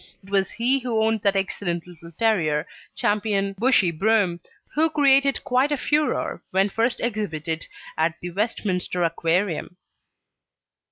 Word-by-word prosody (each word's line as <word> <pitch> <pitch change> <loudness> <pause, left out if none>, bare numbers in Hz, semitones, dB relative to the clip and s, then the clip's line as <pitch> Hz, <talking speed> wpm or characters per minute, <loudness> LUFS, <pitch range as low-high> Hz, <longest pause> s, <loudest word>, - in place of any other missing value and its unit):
It 195 - -15
was 195 -2 +2
he 250 +4 +1
who 235 -4 0
owned 220 -1 +1
that 200 -1 +2
excellent 185 -3 -2
little 170 -1 -13
terrier 160 -8 +1 0.3
Ch. - - -8 0.5
Bushey 210 -5 +3
Broom, 195 0 +2 0.3
who 320 +2 +3
created 275 -2 +3
quite 260 +3 +2
a 290 - +1
furore 300 +3 0
when 195 +2 +2
first 230 +4 0
exhibited 170 -8 -3 0.3
at 160 0 +1
the 175 - -6
Westminster 185 -3 -1
Aquarium. 170 +2 -1
200 Hz, 130 wpm, -23 LUFS, 175-240 Hz, 0.5 s, Bushey